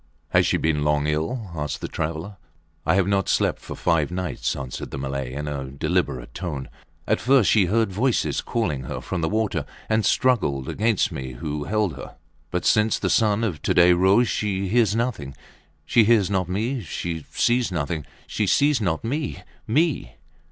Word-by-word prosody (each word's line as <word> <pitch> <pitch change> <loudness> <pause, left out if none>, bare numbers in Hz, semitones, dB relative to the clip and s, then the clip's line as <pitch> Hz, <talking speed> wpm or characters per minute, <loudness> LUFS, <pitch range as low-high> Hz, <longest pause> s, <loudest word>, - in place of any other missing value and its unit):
Has - - +3
she - - +2
been 75 -2 0
long 75 -1 +1
ill? 85 +8 -2
asked 75 -2 -3
the - - -4
traveller. 80 +5 -4 0.5
I - - +4
have 95 -2 +3
not 100 -2 +1
slept - - +1
for - - -7
five 80 -4 +1
nights, 90 0 -2
answered 65 -2 -6
the - - -6
Malay, 70 -1 -3
in 75 +2 -4
a 70 -2 -3
deliberate 65 -2 -2
tone. 75 -7 -5 0.4
At - - +1
first 130 -4 +4
she 105 -4 +5
heard 110 +1 +1
voices 120 +5 +1
calling 75 - -2
her - - -4
from 90 - -4
the 80 - 0
water 105 -7 0 0.2
and 110 0 +2
struggled 85 - +1
against 110 -1 +1
me 65 -1 -5
who 75 +3 -4
held 105 -7 0
her. - - -9 0.3
But 90 0 -2
since 110 0 +3
the - - -1
sun 110 0 +3
of 90 -10 -2
to - - 0
day 90 0 +7
rose 95 +7 +4
she 100 -3 -1
hears 110 -1 +3
nothing 110 - -2 0.5
she 115 - +4
hears 105 -3 +3
not 95 -2 0
me. 115 +7 -1
She 80 -2 -4
sees 120 -3 +1
nothing. 80 -2 -2 0.2
She 105 - -1
sees 145 +3 +3
not 85 -6 -1
me 140 +5 -3 0.2
me! 130 - +1
95 Hz, 180 wpm, -24 LUFS, 75-110 Hz, 0.5 s, day